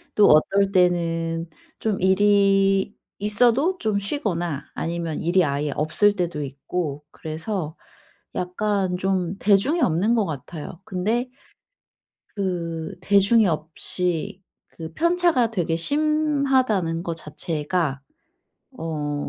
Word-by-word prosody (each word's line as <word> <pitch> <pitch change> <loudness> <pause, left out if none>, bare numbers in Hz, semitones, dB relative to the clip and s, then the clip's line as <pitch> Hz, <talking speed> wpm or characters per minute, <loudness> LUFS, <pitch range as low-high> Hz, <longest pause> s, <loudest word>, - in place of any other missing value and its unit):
또 210 - +6
어떨 195 +6 +4
때는 165 -2 +1 0.3
좀 210 -4 -2
일이 195 0 +3 0.2
있어도 245 - +2
좀 215 -6 0
쉬거나 175 - -2
아니면 170 -2 -3
일이 175 +1 +3
아예 145 +1 -1
없을 180 +7 +2
때도 175 -5 -2
있고 145 +2 -4
그래서 160 +1 -5 0.6
약간 185 0 -1
좀 185 0 -1
대중이 215 - +3
없는 190 +8 +2
것 215 -3 +2
같아요. 160 +4 -7
근데 220 +6 -1 1.1
그 175 -2 -3
대중이 200 +2 +4
없이 175 +4 -2 0.3
그 160 -1 -9
편차가 340 -8 +2
되게 170 -5 -1
심하다는 270 - +1
것 170 -2 -3
자체가 150 -1 -2 0.8
어 150 -3 -3
185 Hz, 205 characters per minute, -23 LUFS, 165-210 Hz, 1.1 s, 또